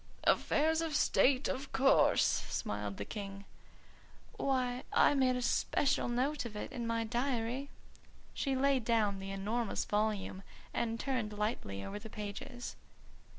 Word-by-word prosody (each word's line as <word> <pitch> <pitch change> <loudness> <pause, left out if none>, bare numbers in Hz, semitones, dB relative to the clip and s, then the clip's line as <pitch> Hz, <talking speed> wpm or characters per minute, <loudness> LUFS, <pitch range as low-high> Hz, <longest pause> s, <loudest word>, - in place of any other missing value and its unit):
"Affairs 320 +2 +3
of 320 -3 -2
state, 265 -1 +3
of 270 +1 -3
course," 270 +1 +5
smiled 105 -1 -2
the 100 - -4
King. 200 - -6 0.9
"Why, 255 -2 0
I - - +5
made 260 -2 +3
a 250 - -2
special 275 +1 +1
note 265 +5 0
of 230 -3 -7
it 210 - -5
in 235 -2 -4
my 230 0 0
diary." 245 +2 -1 0.6
She 275 -2 -1
laid 270 -1 +2
down 215 -4 +2
the 195 0 -6
enormous 210 +4 -1
volume 205 -2 -1 0.3
and 230 0 -1
turned 240 -6 -2
lightly 155 - -2
over 205 +1 -5
the 220 +1 -10
pages. 210 +4 -6
235 Hz, 140 wpm, -34 LUFS, 210-265 Hz, 0.9 s, course